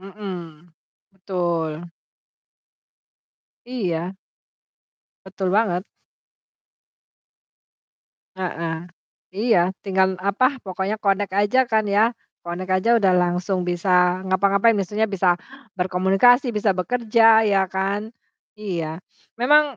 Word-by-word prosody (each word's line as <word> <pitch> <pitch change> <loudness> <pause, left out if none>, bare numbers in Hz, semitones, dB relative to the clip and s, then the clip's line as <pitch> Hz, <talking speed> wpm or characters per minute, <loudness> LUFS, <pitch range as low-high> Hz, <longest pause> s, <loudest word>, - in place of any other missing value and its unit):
Mhm, 195 +1 -8 0.8
betul. 175 -4 -2 2.0
Iya. 185 -7 -3 1.1
Betul 190 -1 -3
banget. 195 -3 +1 2.5
Heeh. 170 -3 -4 0.5
Iya, 190 -3 +2
tinggal 190 -1 +1
apa, 240 +8 +1
pokoknya 190 +2 -3
connect 200 -2 -1
aja 235 +5 +2
kan 220 -1 +1
ya, 215 +4 +2 0.2
connect 175 +2 -6
aja 235 +4 +3
udah 195 -5 +3
langsung 180 +1 0
bisa 180 +1 +1
ngapa-ngapain, 200 +4 +3
biasanya 210 +1 -1
bisa 190 -4 +1 0.4
berkomunikasi, 190 +8 +3
bisa 210 -3 +1
bekerja, 225 +3 +3
ya 195 -2 +2
kan. 195 +3 -2 0.5
Iya. 170 -6 -4 0.4
Memang 290 +3 +3
195 Hz, 90 wpm, -22 LUFS, 180-215 Hz, 2.5 s, aja